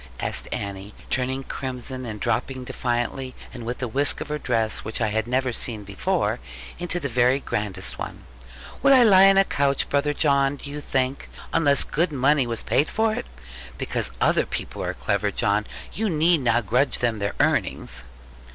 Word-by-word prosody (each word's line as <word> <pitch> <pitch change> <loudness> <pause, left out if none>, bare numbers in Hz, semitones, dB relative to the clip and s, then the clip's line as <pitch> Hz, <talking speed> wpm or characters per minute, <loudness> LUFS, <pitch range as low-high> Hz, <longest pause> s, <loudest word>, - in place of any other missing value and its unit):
asked - - -2
Annie, 100 +1 -5 0.2
turning 130 +1 -1
crimson, 130 -1 -3
and 105 -2 -6
dropping 130 +5 -1
defiantly, 125 0 -2 0.2
and 115 -2 -8
with 125 +2 -4
a - - 0
whisk 140 +5 +2
of - - -6
her 150 0 -2
dress 115 -5 0
which 110 - -4
I 110 -1 +1
never 130 +1 +1
had 120 - -3
seen 110 -4 -2
before, 100 -1 -1 0.4
into 175 0 -1
the 145 - -2
very 125 +1 +3
grandest 100 -7 -3
one: - - -6 0.6
'would 275 0 +6
I 255 -2 +7
lie 195 -3 +7
on 195 - +4
a 195 - +6
couch, 140 -4 0
brother 145 +1 +1
John, 140 -2 +2
do 140 0 -9
you 150 +1 -5
think, 135 -1 -2 0.2
unless 145 -4 +3
good 170 +2 0
money 140 -1 +2
was 115 -1 -1
paid 130 +7 +2
for 220 0 +1
it? 245 +2 -4 0.5
Because 65 - 0
other - - +2
people - - -4
are - - -3
clever, - - 0
John, 105 +1 0 0.3
you 220 0 -1
need 165 -1 +3
not 120 -2 +2
grudge 125 +6 +2
them 115 -3 0
their 100 0 -2
earnings.' 110 - +1
130 Hz, 180 wpm, -24 LUFS, 115-145 Hz, 0.6 s, I